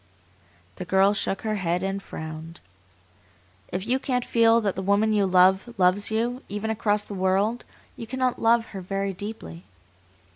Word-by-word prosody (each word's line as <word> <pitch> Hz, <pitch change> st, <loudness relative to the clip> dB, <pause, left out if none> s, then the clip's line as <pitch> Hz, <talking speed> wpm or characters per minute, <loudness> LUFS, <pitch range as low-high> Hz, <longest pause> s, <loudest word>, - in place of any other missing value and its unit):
'" 90 Hz, -1 st, -33 dB
The -, -, -5 dB
girl 190 Hz, +3 st, +3 dB
shook 195 Hz, -1 st, -2 dB
her 215 Hz, -1 st, -1 dB
head 175 Hz, -1 st, -1 dB
and 195 Hz, +1 st, -2 dB
frowned. 160 Hz, -1 st, -8 dB, 1.1 s
"If 185 Hz, +2 st, -3 dB
you 255 Hz, +3 st, +1 dB
can't 250 Hz, -2 st, -1 dB
feel 230 Hz, 0 st, +4 dB
that 200 Hz, -3 st, -1 dB
the 190 Hz, -, -3 dB
woman 200 Hz, +3 st, +2 dB
you 205 Hz, -2 st, +2 dB
love 190 Hz, +5 st, +3 dB
loves 185 Hz, +2 st, +3 dB
you, 235 Hz, +3 st, -1 dB
even 205 Hz, +2 st, -3 dB
across 210 Hz, -1 st, 0 dB
the -, -, -8 dB
world, 195 Hz, +5 st, 0 dB, 0.3 s
you 230 Hz, -, -8 dB
cannot 255 Hz, 0 st, -1 dB
love 230 Hz, 0 st, +3 dB
her 195 Hz, -, -5 dB
very 195 Hz, +1 st, -3 dB
deeply." 180 Hz, -, -8 dB
200 Hz, 170 wpm, -25 LUFS, 185-225 Hz, 1.1 s, feel